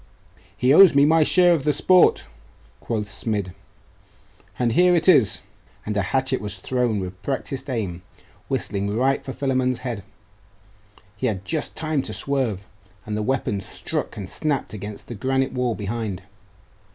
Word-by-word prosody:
'He 125 Hz, +2 st, +3 dB
owes 185 Hz, -2 st, +8 dB
me 140 Hz, 0 st, +6 dB
my 160 Hz, +2 st, +4 dB
share 175 Hz, +3 st, +5 dB
of 155 Hz, -5 st, 0 dB
the 150 Hz, -, +2 dB
sport,' 180 Hz, +5 st, +4 dB, 0.5 s
quoth 105 Hz, -3 st, -3 dB
Smid. 100 Hz, -2 st, -3 dB, 1.0 s
'And 120 Hz, -2 st, +1 dB
here 180 Hz, +8 st, +4 dB
it 165 Hz, 0 st, +1 dB
is!' 130 Hz, -, +5 dB, 0.4 s
And 105 Hz, -, -3 dB
a 105 Hz, -, +2 dB
hatchet, 130 Hz, +7 st, 0 dB
thrown 115 Hz, +2 st, -1 dB
with 95 Hz, 0 st, -7 dB
practised 135 Hz, 0 st, -3 dB
aim, 100 Hz, -8 st, -3 dB, 0.5 s
whistled 100 Hz, 0 st, -2 dB
right 130 Hz, +6 st, +1 dB
for 130 Hz, -, -6 dB
Philammon's 130 Hz, -2 st, 0 dB
head 120 Hz, -5 st, -3 dB, 1.1 s
he 125 Hz, +5 st, -1 dB
had 100 Hz, -4 st, -3 dB
just 155 Hz, +5 st, -3 dB
time 155 Hz, -3 st, -1 dB
to 125 Hz, -5 st, -6 dB
swerve, 120 Hz, -9 st, -1 dB, 0.4 s
and 105 Hz, -, -3 dB
the 105 Hz, -, -1 dB
weapon 110 Hz, -3 st, -1 dB
struck -, -, -5 dB
and 100 Hz, -3 st, -5 dB
snapped 145 Hz, -1 st, -2 dB
against 105 Hz, 0 st, -7 dB
the -, -, -6 dB
granite 130 Hz, +4 st, 0 dB
wall 125 Hz, -3 st, -1 dB
behind. 100 Hz, -1 st, -4 dB
125 Hz, 150 wpm, -23 LUFS, 105-140 Hz, 1.1 s, owes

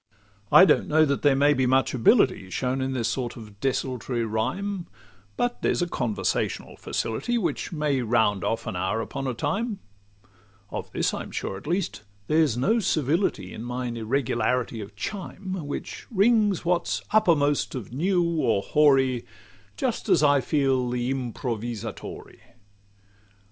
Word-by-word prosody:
I 185 Hz, -, +9 dB
don't -, -, +3 dB
know 155 Hz, +1 st, +4 dB
that 140 Hz, -2 st, -1 dB
there 145 Hz, -2 st, +4 dB
may 145 Hz, +2 st, +4 dB
be 130 Hz, -2 st, +1 dB
much 130 Hz, +1 st, +2 dB
ability 125 Hz, -, +3 dB
Shown 130 Hz, +7 st, -1 dB
in 130 Hz, 0 st, -1 dB
this 120 Hz, -3 st, -1 dB
sort 120 Hz, +1 st, -3 dB
of 105 Hz, -3 st, -12 dB
desultory 125 Hz, -2 st, -1 dB
rhyme; 170 Hz, -, -2 dB, 0.5 s
But 245 Hz, 0 st, -1 dB
there's -, -, +1 dB
a -, -, -1 dB
conversational 120 Hz, -9 st, -2 dB
facility, 240 Hz, -, -2 dB
Which 215 Hz, -, -2 dB
may 150 Hz, -5 st, 0 dB
round 110 Hz, -5 st, +2 dB
off 115 Hz, -, -1 dB
an -, -, -4 dB
hour 95 Hz, +5 st, -1 dB
upon 135 Hz, +4 st, -4 dB
a 125 Hz, -, -2 dB
time. 210 Hz, -, -2 dB, 0.9 s
Of -, -, -5 dB
this -, -, 0 dB
I'm -, -, -5 dB
sure -, -, -4 dB
at 95 Hz, -, -10 dB
least, 175 Hz, -, -1 dB, 0.2 s
there's 150 Hz, -3 st, +2 dB
no 220 Hz, -, +2 dB
servility 165 Hz, -, 0 dB
In -, -, -7 dB
mine 125 Hz, 0 st, -3 dB
irregularity 120 Hz, 0 st, -1 dB
of 100 Hz, 0 st, -10 dB
chime, 185 Hz, -, -5 dB
Which 145 Hz, -, -6 dB
rings 210 Hz, -3 st, +3 dB
what 175 Hz, 0 st, +1 dB
's -, -, -2 dB
uppermost 150 Hz, -11 st, +3 dB
of 120 Hz, -3 st, -7 dB
new 175 Hz, +6 st, +2 dB, 0.2 s
or 100 Hz, -4 st, +1 dB
hoary, 135 Hz, -3 st, +3 dB, 0.5 s
Just 255 Hz, -4 st, -2 dB
as -, -, +4 dB
I 145 Hz, -2 st, +5 dB
feel 135 Hz, -3 st, +1 dB
the 125 Hz, +1 st, -1 dB
'Improvvisatore. 120 Hz, -3 st, -5 dB
135 Hz, 150 wpm, -25 LUFS, 120-170 Hz, 0.9 s, I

